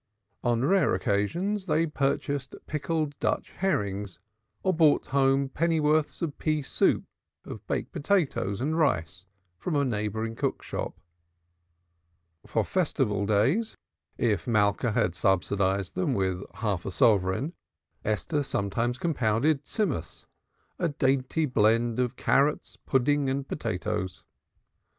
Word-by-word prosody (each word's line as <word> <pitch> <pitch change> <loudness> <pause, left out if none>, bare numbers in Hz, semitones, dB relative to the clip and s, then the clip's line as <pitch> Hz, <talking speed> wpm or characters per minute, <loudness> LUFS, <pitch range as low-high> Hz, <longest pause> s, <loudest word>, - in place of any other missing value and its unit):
On 120 +1 +1
rare 185 - +3
occasions 170 - -1
they 165 0 +2
purchased 140 -2 -1
pickled 155 0 -2
Dutch - - -1
herrings 100 - -2 0.5
or 190 - +2
brought 160 -3 +4
home 135 0 +2
pennyworths 155 +1 +1
of 150 -4 -3
pea 155 -2 0
soup - - +2 0.4
or - - -8
of - - -9
baked - - -2
potatoes 135 - 0
and 155 +4 0
rice 95 - 0 0.3
from 170 - -2
a 140 -1 +2
neighboring 110 -1 -2
cook - - -2
shop. - - -5 1.5
For - - +1
Festival 120 - 0
days, 130 - +2 0.4
if 105 -8 0
Malka 110 +1 +2
had 110 -6 +1
subsidized 95 0 +1
them 175 -8 0
with 95 -2 0
a 95 - -19
half 105 -5 -1
sovereign, 100 - +2 0.5
Esther 125 +9 0
sometimes 120 0 -1
compounded 135 0 +1
Tzimmus, 150 - -2 0.5
a 170 - +1
dainty 135 +2 +1
blend 115 -1 +2
of 125 0 0
carrots, 140 +4 +1
pudding 140 +1 +2
and 135 +1 -2
potatoes. 105 - -3
130 Hz, 120 wpm, -27 LUFS, 105-150 Hz, 1.5 s, brought